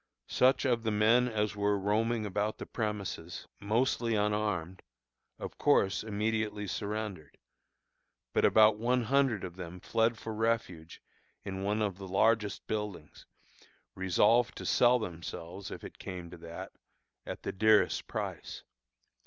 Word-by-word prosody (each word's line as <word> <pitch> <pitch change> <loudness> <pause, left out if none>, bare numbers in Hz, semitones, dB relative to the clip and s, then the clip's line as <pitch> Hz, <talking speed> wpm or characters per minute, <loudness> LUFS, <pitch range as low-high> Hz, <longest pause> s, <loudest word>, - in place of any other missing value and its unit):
Such 130 +1 +3
of 120 -3 +2
the 110 - -1
men 110 +4 +4
as 105 -3 -1
were 100 0 +1
roaming 110 +3 0
about 105 +2 -1
the - - -6
premises, 100 -6 -4
mostly 115 +2 +1
unarmed, 105 -4 -1 0.6
of - - -8
course 95 +2 +3
immediately 105 0 -1
surrendered; 100 -6 -4 1.0
but - - +2
about 110 -1 +6
one 125 +2 +1
hundred 130 -4 +2
of 90 -1 -7
them 90 0 -7
fled 115 +4 +1
for 110 - -6
refuge 110 -7 -2 0.4
in 95 -1 -4
one 105 +2 0
of 100 -3 -2
the 95 - -7
largest 105 +2 +1
buildings, 105 -8 -5 0.7
resolved 105 +6 +3
to - - -6
sell 125 0 +5
themselves 90 -2 -6
(if - - -8
it - - -10
came 90 -3 -7
to 90 - -9
that) 85 0 -8 0.6
at - - -6
the - - -2
dearest 110 +1 +3
price. - - -5
105 Hz, 135 wpm, -31 LUFS, 95-110 Hz, 1.0 s, about